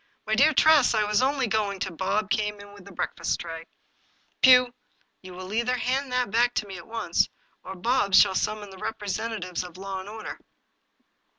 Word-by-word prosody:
" - - -45
My 215 - -2
dear 280 +8 +5
Tress, 305 -4 +5
I 215 - +2
was 210 +2 +1
only 270 0 +1
going 215 -3 -1
" - - -7
Bob 215 +3 -1
came 210 -1 -1
in 205 0 -13
with 200 -2 -15
the 200 - -12
breakfast 180 - -3
tray. 165 -1 -7 0.4
" - - -40
Pugh, 250 -1 +6 0.5
you 185 -1 -11
will 185 +2 -8
either 235 +3 0
hand 255 +3 -1
me - - -13 0.2
that 240 +2 +2 0.2
at 170 - -11
once, 225 0 0 0.3
or 190 - -8
Bob 200 0 +1
shall - - +6
summon 205 +1 -2
the 190 - -12
representatives 205 -3 -4
of 180 -1 -11
law 195 0 -5
and 190 +2 -9
order." 220 0 -8
210 Hz, 190 wpm, -26 LUFS, 190-240 Hz, 0.5 s, Pugh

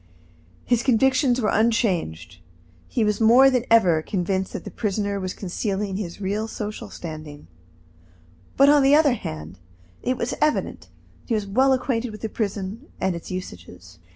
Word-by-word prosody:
His 240 -2 +2
convictions 260 +1 +3
were 215 -3 +1
unchanged. 175 - 0 0.5
He 235 - 0
was 210 +1 0
more 250 +5 +7
than 250 -2 0
ever 180 -9 +4
convinced 190 +2 -2
that - - -5
the - - -8
prisoner 205 -1 -2
was 185 -1 -4
concealing 195 +1 -3
his 180 -4 -6
real 205 +3 -2
social 210 -1 -6
standing, 155 -3 -9 1.1
but, 275 - +6
on 290 0 +6
the 275 +2 +5
other 300 -4 +4
hand, 80 - -7 0.4
it 255 0 -1
was 235 - -2
evident 305 0 0
that - - -19 0.4
he 235 - -1
was 210 -2 -2
well 260 +7 +3
acquainted 250 -2 0
with 215 - -10
the 220 - -3
prison 210 +4 -4
and 190 -2 0
its 170 - -8
usages. 90 - -9
210 Hz, 160 wpm, -23 LUFS, 185-245 Hz, 1.1 s, more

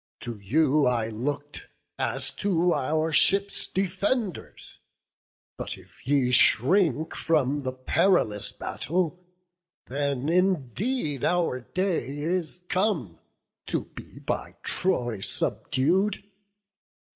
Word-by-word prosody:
to 120 -3 -7
you 145 +7 +3
I 115 -3 +1
look'd 145 +6 -4 0.3
As 135 0 -1
to 180 -3 +2
our 155 +4 0
ships' 195 +5 +3
defenders; 195 +3 -2 0.8
but - - -4
if - - -19
ye 135 -3 +3
Shrink 155 - +4
from 145 -3 +1
the 130 -1 -2
perilous 130 - +1
battle, 180 +1 -2 0.6
then 140 0 -2
indeed 180 - 0
Our 175 -7 +1
day 155 -2 -2
is 175 +3 -2
come, 165 - 0 0.5
to - - -1
be - - -11
by - - -4
Troy 120 - 0
subdu'd. 180 - 0
155 Hz, 100 wpm, -26 LUFS, 130-185 Hz, 0.8 s, Shrink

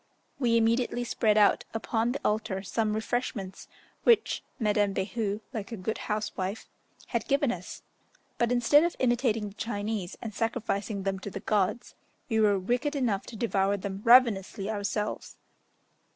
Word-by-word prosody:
We 235 -3 +3
immediately 235 +2 +1
spread 220 -3 +1
out 210 -1 +4
upon 225 +1 0
the 275 - -3
altar 210 -2 0
some 215 +1 -1
refreshments, 220 -4 -3 0.4
which 470 -3 +3
Madame 210 -4 +1
Behu, 205 +2 -2
like 220 -1 -5
a 225 - -4
good 205 +4 -3
housewife, 210 -1 -3 0.4
had - - -2
given 280 -2 +2
us; 180 -3 -7 0.6
but, 235 0 +2
instead 245 +5 +5
of 345 - 0
imitating 235 -4 +1
the - - -15
Chinese, 205 -3 -3
and 220 -2 -6
sacrificing 215 -2 -2
them 195 0 -1
to 205 - -6
the 195 - -6
gods, 210 +2 0 0.4
we 225 -2 +2
were 205 -2 +4
wicked 245 +10 -1
enough 230 -8 0
to 235 - -8
devour 200 -3 +1
them 195 0 -5
ravenously 220 -4 +4
ourselves. 210 0 -3
215 Hz, 150 wpm, -28 LUFS, 200-235 Hz, 0.6 s, instead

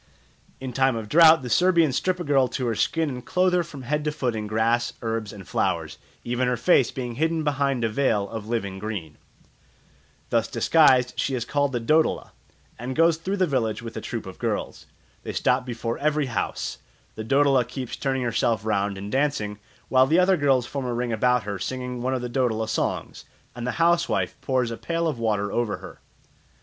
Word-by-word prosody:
In 130 -1 -6
time 130 0 +2
of 110 -2 -5
drought 160 +2 +6
the 125 - -5
Serbians 170 -5 +3
strip 185 +4 0
a - - -3
girl 140 -4 +3
to 125 - -3
her 115 - 0
skin 160 +8 0
and 125 -3 -5
clothe 180 +6 +1
her 180 - +3
from 145 -5 -10
head 150 +4 -1
to 150 - +1
foot 125 -6 -2
in 105 -1 -4
grass, 115 +2 +1
herbs, 115 -2 -2
and 100 -3 -11
flowers, - - -1 0.2
even 125 +1 -1
her 125 -1 0
face 135 -7 +4
being 120 -3 -5
hidden 160 0 +1
behind 140 -4 0
a - - +3
veil 110 -4 +1
of 110 0 -7
living 100 -5 -3
green. 95 -8 -6 1.1
Thus - - +2
disguised 130 -6 +4
she 135 - 0
is 120 -2 -3
called 145 0 0
the 120 - -1
Dodola, 155 +7 +1 0.5
and 125 +2 -4
goes 165 0 +4
through 190 +5 -3
the 185 - +3
village 120 -8 -1
with 115 -1 -7
a - - -4
troop - - -5
of - - -10
girls. - - -3 0.3
They - - -6
stop 125 0 +1
before 115 -1 -3
every 150 0 +1
house; 115 - -3 0.3
the 110 - -6
Dodola 135 +2 +3
keeps 125 +1 -6
turning 135 -2 -1
herself 115 -2 0
round 100 -2 0
and 100 +2 -7
dancing, 130 -7 -1 0.3
while 130 0 +4
the 160 +4 +3
other 185 +1 +5
girls 135 -6 +2
form 135 +1 -4
a 120 - -2
ring 120 -1 -2
about 125 +2 +2
her 100 -1 -4
singing 125 +3 -4
one 130 +1 0
of 125 - -3
the - - -2
Dodola 120 -3 0
songs, 110 - -3 0.3
and 120 0 -5
the - - -1
housewife 170 0 +1
pours 130 -3 0
a 115 - -5
pail 170 0 -1
of 145 -7 -3
water 105 -3 0
over 120 -3 -1
her. - - -12
125 Hz, 205 wpm, -24 LUFS, 115-145 Hz, 1.1 s, drought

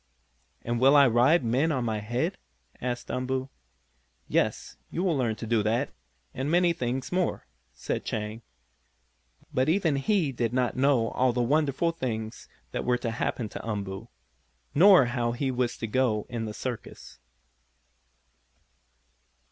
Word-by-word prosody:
"And 120 0 -1
will 135 +3 +6
I 140 -1 +7
ride 125 +7 +4
men 130 +8 +2
on 130 -5 -1
my 110 -2 -1
head?" 120 - -2 0.4
asked 125 -1 -3
Umboo. 130 +1 -2 0.8
"Yes, - - 0
you 175 - -2
will 180 -5 +2
learn 120 -5 0
to 115 - -7
do 115 -1 +2
that, 115 +6 0 0.4
and 135 +3 -3
many 175 +1 +3
things 130 -4 -3
more," 180 -1 -1 0.3
said - - -3
Chang. 105 +1 -4 1.1
But 130 +3 +2
even 165 -5 +2
he 165 0 +1
did 120 -2 -2
not 125 -1 +1
know 130 -3 +3
all 125 -1 +1
the 120 0 +1
wonderful 150 +4 +1
things 110 -8 -5 0.2
that - - -3
were 125 0 +2
to 120 -1 -3
happen 115 0 -2
to - - -8
Umboo, 100 -1 -4 0.7
nor 180 -1 +7
how 120 -1 -1
he 130 +2 -1
was 125 -1 -1
to - - -4
go 110 -2 +1
in 120 -2 -3
the 105 - -5
circus. 125 -3 -7
125 Hz, 150 wpm, -27 LUFS, 115-140 Hz, 1.1 s, I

